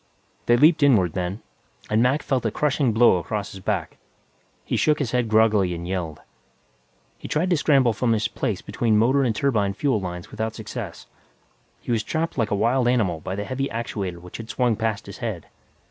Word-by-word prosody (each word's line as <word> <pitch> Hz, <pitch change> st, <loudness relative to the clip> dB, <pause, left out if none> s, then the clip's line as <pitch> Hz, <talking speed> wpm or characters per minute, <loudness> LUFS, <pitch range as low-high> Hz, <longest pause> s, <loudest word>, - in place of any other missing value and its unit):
They 120 Hz, -, +5 dB
leaped 155 Hz, +4 st, +5 dB
inward, 105 Hz, -, +4 dB
then, 90 Hz, +4 st, -3 dB, 0.4 s
and 110 Hz, +1 st, +2 dB
Mac 130 Hz, +5 st, +2 dB
felt 130 Hz, -4 st, 0 dB
a 115 Hz, -, +1 dB
crushing 140 Hz, +1 st, +1 dB
blow 110 Hz, -3 st, +5 dB
across 100 Hz, +4 st, -4 dB
his 95 Hz, -, -9 dB
back. 95 Hz, -4 st, -3 dB, 0.7 s
He -, -, -2 dB
shook 150 Hz, -1 st, +3 dB
his 140 Hz, -6 st, -2 dB
head 125 Hz, -2 st, 0 dB
groggily 105 Hz, -5 st, +3 dB
and 85 Hz, +1 st, -6 dB
yelled. 90 Hz, -5 st, -4 dB, 1.0 s
He -, -, -8 dB
tried 175 Hz, +5 st, 0 dB
to 175 Hz, -, +4 dB
scramble 135 Hz, -6 st, +3 dB
from 115 Hz, +2 st, +1 dB
his 110 Hz, -1 st, 0 dB
place 105 Hz, -3 st, -3 dB
between 110 Hz, +1 st, +1 dB
motor 130 Hz, +6 st, +3 dB
and 120 Hz, -5 st, +1 dB
turbine 105 Hz, -8 st, +1 dB
fuel 135 Hz, -4 st, +1 dB
lines 90 Hz, -1 st, -6 dB
without 110 Hz, 0 st, -3 dB
success; -, -, -7 dB, 0.8 s
he -, -, -5 dB
was 115 Hz, -2 st, +2 dB
trapped 160 Hz, +8 st, -2 dB
like 115 Hz, -4 st, 0 dB
a -, -, +1 dB
wild 120 Hz, +4 st, +2 dB
animal 110 Hz, -10 st, +1 dB
by 95 Hz, +4 st, -5 dB
the 100 Hz, -, -3 dB
heavy 135 Hz, +3 st, -2 dB
actuator 100 Hz, -6 st, -4 dB
which 90 Hz, +1 st, -10 dB
had 115 Hz, 0 st, -9 dB
swung 125 Hz, -3 st, +1 dB
past 110 Hz, -1 st, -2 dB
his 100 Hz, -, -10 dB
head. 110 Hz, -9 st, -4 dB
110 Hz, 195 wpm, -23 LUFS, 100-125 Hz, 1.0 s, They